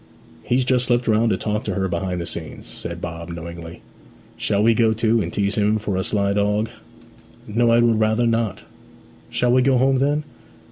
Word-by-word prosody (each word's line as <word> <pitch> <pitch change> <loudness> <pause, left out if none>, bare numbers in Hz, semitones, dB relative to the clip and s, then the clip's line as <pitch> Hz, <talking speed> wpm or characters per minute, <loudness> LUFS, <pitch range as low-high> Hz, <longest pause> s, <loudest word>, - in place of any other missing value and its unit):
'He's 125 +1 +1
just 125 -1 +2
slipped 120 -1 +1
round 110 +1 +3
to 95 - +1
talk 105 +2 -2
to 95 - -2
her 95 -1 0
behind 90 -1 -2
the - - -4
scenes,' - - -7
said 85 0 -8
Bob 85 0 -6
knowingly. 85 0 -8 0.5
'Shall 105 -1 0
we 115 +1 +5
go 110 0 +3
too, 115 0 +2
and 85 -3 -3
tease 100 0 0
him 105 +1 +2
for 105 -2 -3
a 95 - 0
sly 100 0 0
dog?' 105 +2 +1 0.8
'No, 115 +3 +1
I 115 0 +5
would 115 -2 +3
rather 110 +2 +2
not.' 115 -3 0 0.7
'Shall 125 0 +1
we 130 +1 +4
go 130 0 +3
home, 130 +1 +3
then?' 145 +3 +1
110 Hz, 195 wpm, -21 LUFS, 100-120 Hz, 0.8 s, we